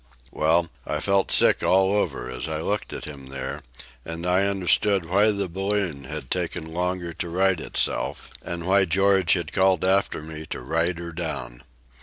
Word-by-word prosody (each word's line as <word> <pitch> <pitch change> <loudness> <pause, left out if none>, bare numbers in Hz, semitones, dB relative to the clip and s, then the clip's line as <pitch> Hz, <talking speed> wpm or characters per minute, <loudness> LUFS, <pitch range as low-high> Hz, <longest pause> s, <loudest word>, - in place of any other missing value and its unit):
Well, 85 +2 +2 0.2
I - - -3
felt 100 -1 +1
sick - - +5
all 95 +1 +3
over 105 - -1
as 60 -1 -4
I 80 -1 -3
looked 100 +6 -2
at - - -5
him 70 -3 -9
there, 65 -1 -5 0.4
and 80 +2 -6
I 90 +2 +3
understood 95 0 +2
why 100 +5 +4
the 100 -2 0
balloon 95 -5 -2
had 75 -3 -7
taken 80 0 -2
longer 90 -1 -2
to 85 +1 -4
right 95 0 +2
itself, - - -2
and 85 -1 -5
why 95 +1 +4
George 95 0 +3
had 85 -2 -2
called 95 -2 +3
after 95 -4 +1
me 80 0 -8
to - - -5
ride 80 +6 0
her 85 0 -6
down. 70 -8 -5
85 Hz, 175 wpm, -24 LUFS, 80-95 Hz, 0.4 s, sick